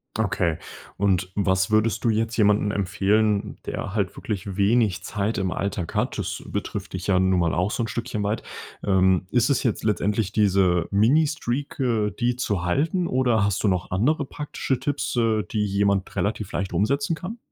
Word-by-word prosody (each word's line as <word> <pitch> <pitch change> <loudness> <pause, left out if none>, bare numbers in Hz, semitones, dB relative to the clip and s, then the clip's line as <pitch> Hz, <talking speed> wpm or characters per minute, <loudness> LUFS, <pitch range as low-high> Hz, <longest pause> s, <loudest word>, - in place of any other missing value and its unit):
Okay 80 -2 0 0.4
und 95 -2 +1
was 95 -2 +1
würdest 110 0 +2
du 115 - +3
jetzt 110 +1 0
jemanden 105 -1 +3
empfehlen, 105 +2 +1
der 100 - -4
halt 100 -4 -1
wirklich 100 -2 -4
wenig 100 -2 +2
Zeit 105 +3 -2
im 95 -2 -1
Alltag 95 -2 -3
hat? - - 0
Das - - -3
betrifft - - -4
dich 90 -1 -4
ja 95 -2 +3
nun 95 0 +3
mal 85 -2 +1
auch 90 +3 +1
so 120 - -1
'n - - -2
Stückchen 115 -1 -3
weit. 105 +2 -1 0.4
Ähm, 95 -2 +3
ist 120 +3 +2
es 140 - +2
jetzt 120 - -1
letztendlich 105 -1 0
diese 95 -5 +2
Mini 120 +11 +4
Streak, 140 -1 -3
äh, 115 -5 +1
die 120 0 +1
zu 100 -7 -1
halten 160 - +1
oder 125 -5 +2
hast 100 -1 0
du - - +3
noch 90 -3 0
andere 135 +11 +1
praktische 135 -2 -3
Tipps, 145 -2 -2
äh, 110 -3 +2
die 105 -2 0
jemand 100 -1 0
relativ 105 -1 -2
leicht 95 -2 -3
umsetzen 140 - +1
kann? 190 +8 -7
105 Hz, 180 wpm, -24 LUFS, 95-115 Hz, 0.4 s, Mini